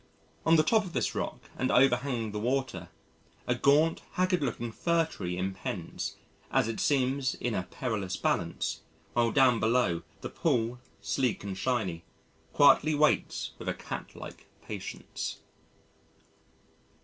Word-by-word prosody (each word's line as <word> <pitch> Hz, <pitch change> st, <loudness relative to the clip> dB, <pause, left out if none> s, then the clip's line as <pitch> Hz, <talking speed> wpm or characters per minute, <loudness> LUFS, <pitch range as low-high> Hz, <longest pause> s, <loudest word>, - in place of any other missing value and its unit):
On 165 Hz, -, +7 dB
the 155 Hz, -, +5 dB
top 220 Hz, +6 st, +3 dB
of 180 Hz, -4 st, -8 dB
this -, -, 0 dB
rock -, -, -3 dB, 0.2 s
and 130 Hz, -, +1 dB
overhanging 125 Hz, -3 st, +3 dB
the 105 Hz, -, -3 dB
water 120 Hz, -7 st, -1 dB, 0.6 s
a 125 Hz, -, +2 dB
gaunt, 145 Hz, +6 st, +3 dB
haggard 185 Hz, -2 st, +2 dB
looking 120 Hz, -4 st, -2 dB
Fir 170 Hz, +6 st, +2 dB
tree 90 Hz, -, -5 dB
impends, 95 Hz, +1 st, -4 dB, 0.3 s
as -, -, +2 dB
it 115 Hz, -1 st, -3 dB
seems 135 Hz, -1 st, +1 dB
in 120 Hz, -, -2 dB
a 95 Hz, -, 0 dB
perilous 110 Hz, -8 st, -3 dB
balance, -, -, -1 dB, 0.3 s
while 120 Hz, -1 st, +2 dB
down 130 Hz, -3 st, +5 dB
below, 110 Hz, -7 st, +2 dB, 0.2 s
the -, -, -4 dB
pool, 125 Hz, -6 st, 0 dB, 0.2 s
sleek 115 Hz, +4 st, 0 dB
and 100 Hz, -2 st, -4 dB
shiny, 95 Hz, -7 st, -1 dB, 0.5 s
quietly 155 Hz, 0 st, +5 dB
waits 150 Hz, +1 st, +2 dB
with -, -, -3 dB
a -, -, -1 dB
catlike -, -, -8 dB, 0.2 s
patience. -, -, -5 dB
125 Hz, 135 wpm, -30 LUFS, 110-140 Hz, 0.6 s, On